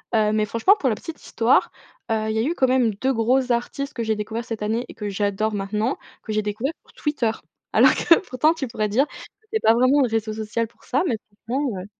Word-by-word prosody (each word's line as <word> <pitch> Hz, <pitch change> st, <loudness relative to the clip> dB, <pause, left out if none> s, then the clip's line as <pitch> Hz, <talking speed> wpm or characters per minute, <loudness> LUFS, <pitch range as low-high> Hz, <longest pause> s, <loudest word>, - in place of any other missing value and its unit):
heu, 215 Hz, -1 st, +3 dB
mais 215 Hz, 0 st, +1 dB
franchement 230 Hz, -, +4 dB
pour 270 Hz, -, 0 dB
la 220 Hz, -, +2 dB
petite 320 Hz, +6 st, -9 dB
histoire, 230 Hz, +2 st, +2 dB, 0.4 s
heu, 220 Hz, -1 st, 0 dB
il -, -, 0 dB
y 220 Hz, -, 0 dB
a -, -, +3 dB
eu 330 Hz, +6 st, 0 dB
quand 260 Hz, -, +3 dB
même 250 Hz, -4 st, +3 dB
2 260 Hz, +6 st, 0 dB
gros 250 Hz, +3 st, +2 dB
artistes 275 Hz, +4 st, -2 dB
que 235 Hz, -2 st, -3 dB
j'ai 220 Hz, -1 st, 0 dB
découverts 220 Hz, +2 st, -4 dB
cette 225 Hz, -3 st, -5 dB
année 225 Hz, +3 st, -1 dB
et -, -, -10 dB
que 210 Hz, -2 st, -5 dB
j'adore 205 Hz, +2 st, -1 dB
maintenant, 210 Hz, +5 st, -1 dB, 0.3 s
que 215 Hz, -, -5 dB
j'ai 215 Hz, 0 st, +1 dB
découverts 215 Hz, +8 st, -2 dB
sur -, -, -22 dB
Twitter. 270 Hz, -7 st, 0 dB, 0.4 s
Alors -, -, +6 dB
que 335 Hz, -, +5 dB
pourtant 300 Hz, +6 st, +3 dB
tu 290 Hz, -6 st, -4 dB
pourrais 215 Hz, -1 st, -1 dB
dire, 250 Hz, +8 st, +2 dB, 0.5 s
c'est 440 Hz, -, +1 dB
pas 225 Hz, -, +5 dB
vraiment 255 Hz, +4 st, +4 dB
le 250 Hz, -, +2 dB
réseau 220 Hz, -1 st, -1 dB
social 220 Hz, +1 st, -2 dB
pour -, -, -25 dB
ça, 270 Hz, +7 st, +1 dB
mais 230 Hz, -, 0 dB, 0.3 s
franchement, 255 Hz, -3 st, -1 dB
heu -, -, -9 dB
230 Hz, 240 wpm, -23 LUFS, 215-260 Hz, 0.5 s, Alors